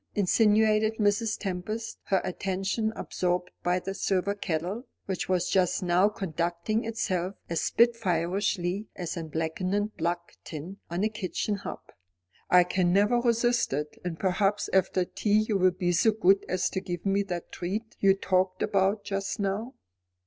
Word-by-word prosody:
insinuated 215 +2 +3
Mrs. 210 +1 +1
Tempest, 215 +4 -4
her 190 -2 +2
attention 195 +4 -1
absorbed 180 0 -2
by 180 +1 +1
the 195 +1 -4
silver 195 0 0
kettle, 200 +5 -3 0.2
which 190 -1 -3
was 180 -1 +1
just 185 -1 +2
now 180 +3 +4
conducting 175 +4 -2
itself 195 -4 -2 0.2
as 165 - 0
spitfireishly 195 -3 +1
as 175 -3 -4
any 165 -2 -5
blackened 185 +7 -1
block 170 +1 -2
tin 165 +5 -7
on 175 +3 -1
a - - +4
kitchen 210 0 -2
hob. 200 - -5 0.7
"I 180 0 +7
can 180 0 +1
never 205 +6 +4
resist 240 - +2
it. 150 +2 -3
And 175 -2 -4
perhaps 195 +2 +1
after 185 -1 +2
tea 215 +3 +1
you 215 - 0
will 185 0 +5
be 180 0 -1
so 180 +6 +4
good 195 -2 +3
as 185 0 0
to 190 - -2
give 175 -2 -5
me 195 +1 +2
the 180 -4 -3
treat 205 +5 -4
you 195 -1 +5
talked 185 -1 0
about 200 0 +1
just 195 +2 -3
now." 205 +6 -2
195 Hz, 155 wpm, -28 LUFS, 180-210 Hz, 0.7 s, I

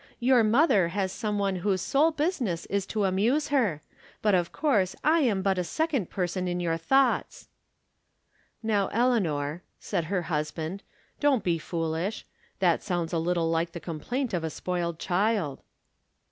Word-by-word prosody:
Your 245 -1 +4
mother 215 - +4
has 190 +1 -2
some 210 0 -2
one 195 -2 0
whose 190 +1 0
sole 280 - +3
business 290 - -1
is 200 -1 0
to 215 -2 -1
amuse 225 +11 +1
her. 210 - +1 0.4
But, 210 -2 +3
of 175 -2 +1
course, 210 - +1
I 320 +2 +4
am 215 -10 +1
but 190 -1 +1
a - - +1
second 280 - -1
person 185 0 -2
in 175 0 -1
your 170 -2 0
thoughts." 260 +10 +1 0.5
" - - -46 0.3
Now, 205 -3 +1
Eleanor," 175 - 0 0.2
said 170 - -2
her 180 +1 -1
husband, 160 +3 -3 0.2
" - - -37
don't 280 -6 +3
be 170 -2 +1
foolish. 165 +5 -3 0.3
That 175 -3 +2
sounds 175 -3 -2
a 165 - +1
little 165 0 0
like 165 0 0
the 170 - -5
complaint 225 - -3
of 175 -2 -1
a 160 - -1
spoiled 170 0 -3
child." 185 -5 0
190 Hz, 165 wpm, -27 LUFS, 170-230 Hz, 0.5 s, Your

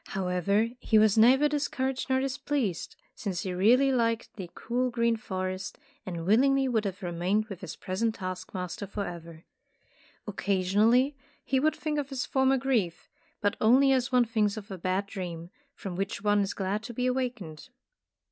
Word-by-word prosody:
However 195 +4 0
he 220 - +2
was 215 -1 +5
neither 255 +6 +6
dis 290 -1 -1
couraged 260 0 -2
nor 260 0 +3
displeased, 265 - -2 0.2
since 190 -5 -4
he 185 -3 -3
really 245 +9 +4
liked 230 -3 0
the 185 -5 -7
cool 250 +2 -1
green 235 -1 +1
forest, 185 -2 -4 0.3
and 170 -3 -4
willingly 270 +7 +4
would 225 -4 0
have 195 0 -4
remained 180 +5 0
with 195 -3 -8
his 180 -4 -7
present 220 +4 -2
task 185 -1 -6
master 180 +2 -5
forever. 170 -5 -6 0.8
Occasionally 210 +7 +2 0.3
he 265 +1 +1
would 310 +3 +2
think 300 -1 -2
of 280 -1 -4
his 270 -2 -3
former 265 0 +2
grief, 235 -10 -1 0.3
but 205 -1 +1
only 260 +5 +5
as 255 -1 +1
one 250 -1 +4
thinks 215 -2 0
of 205 -1 -8
a 190 - -5
bad 185 +3 -1
dream, 175 -4 -6 0.2
from 190 -3 -6
which 195 +1 -3
one 205 0 +3
is 200 0 -2
glad 195 +2 -2
to 235 +1 -8
be 250 - -1
awakened. 245 -11 -3
215 Hz, 170 wpm, -28 LUFS, 185-255 Hz, 0.8 s, neither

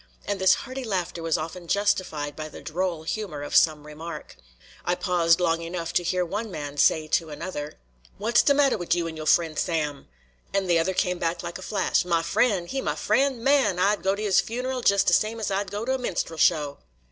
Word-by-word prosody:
And 200 -2 -2
this 190 0 +6
hearty 260 0 -6
laughter 185 -6 -3
was 165 0 +1
often 165 +2 -6
justified 175 -7 0
by 155 0 -6
the - - -10
droll 170 0 -2
humor 160 -5 -4
of - - -4
some 155 -2 +4
remark. 160 +3 -8 0.5
I 175 - +1
paused 175 -3 +2
long 165 -2 +1
enough 170 0 -4
to - - +3
hear 180 +1 0
one 210 +6 -4
man 145 -5 -6
say 155 +2 +4
to 160 0 +1
another: 150 -1 -6 0.4
"Wat's 230 +4 +3
de 280 - +3
mattah 275 -6 +3
wid 175 -1 +1
you 170 -1 -1
an' 160 - -6
yo' 155 -1 -6
fr'en' 165 -2 +3
Sam?" 150 -4 -2 0.5
and 195 -1 +1
the 170 -1 +3
other 185 +3 0
came 180 -1 0
back 170 0 -2
like 175 +1 -6
a - - -10
flash: 200 0 0
"Ma 170 -2 +1
fr'en'? 180 +2 +1
He 270 +9 -3
ma - - -2
fr'en'? 270 -4 +1
Man! 270 -9 +3
I'd 200 +1 +2
go 190 +2 +1
to 210 - -5
his 200 -3 +4
funeral 250 +2 -3
jes' 200 -3 +4
de - - +2
same 220 +2 +2
as 215 - -2
I'd 195 0 -1
go 205 +3 -4
to 260 - 0
a 265 - -1
minstrel 170 -8 -3
show." 150 -4 +2
180 Hz, 220 wpm, -25 LUFS, 165-205 Hz, 0.5 s, this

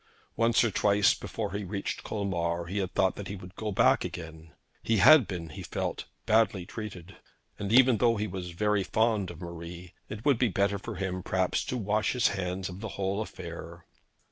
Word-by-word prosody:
Once 115 +1 +3
or 115 - +1
twice 100 +1 +4
before - - -5
he 100 +1 -3
reached 100 +1 -4
Colmar 85 -5 -2
he 95 +4 -3
had 95 -1 -2
thought 95 - +2
that 100 - -6
he 100 - -5
would 90 -1 -11
go 110 -1 -3
back 95 - +4
again. 80 -1 -8 0.3
He 115 - +1
had 150 +3 +8
been, 85 -4 -5
he 75 - -8
felt, - - -3 0.2
badly 110 -4 +3
treated; 95 -4 -8 0.4
and, 100 - -3 0.3
though 115 -1 +3
he 105 - -1
was 95 -3 -5
very 105 +3 +1
fond 110 -1 +1
of 85 0 -10
Marie, 85 0 -8 0.2
it 110 +2 -7
would 140 -5 +4
be 125 - +3
better 100 +1 +1
for - - -6
him 95 -1 -3
perhaps 95 0 0
to 125 - -2
wash 105 -1 0
his 125 -2 +3
hands 95 -1 -3
of 90 0 -8
the 110 0 -5
whole 100 +1 -1
affair. 85 -4 -8
95 Hz, 195 wpm, -29 LUFS, 90-105 Hz, 0.4 s, had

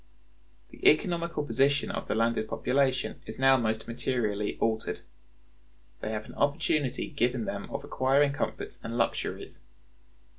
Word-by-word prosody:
The - - -15
economical 170 -5 +3
position 140 0 +2
of - - -4
the - - 0
landed 115 -1 +1
population 130 -1 0
is 110 - -7
now 135 0 +6
most 110 -3 -1
materially 115 -4 -1
altered. 110 -1 -1 1.0
They - - -4
have 110 0 -3
an - - -11
opportunity 145 -2 0
given 125 -5 0
them 100 - -4
of 140 0 -4
acquiring 140 0 +2
comforts 145 - -4
and 115 +1 -4
luxuries. 115 - -2
130 Hz, 135 wpm, -29 LUFS, 110-140 Hz, 1.0 s, now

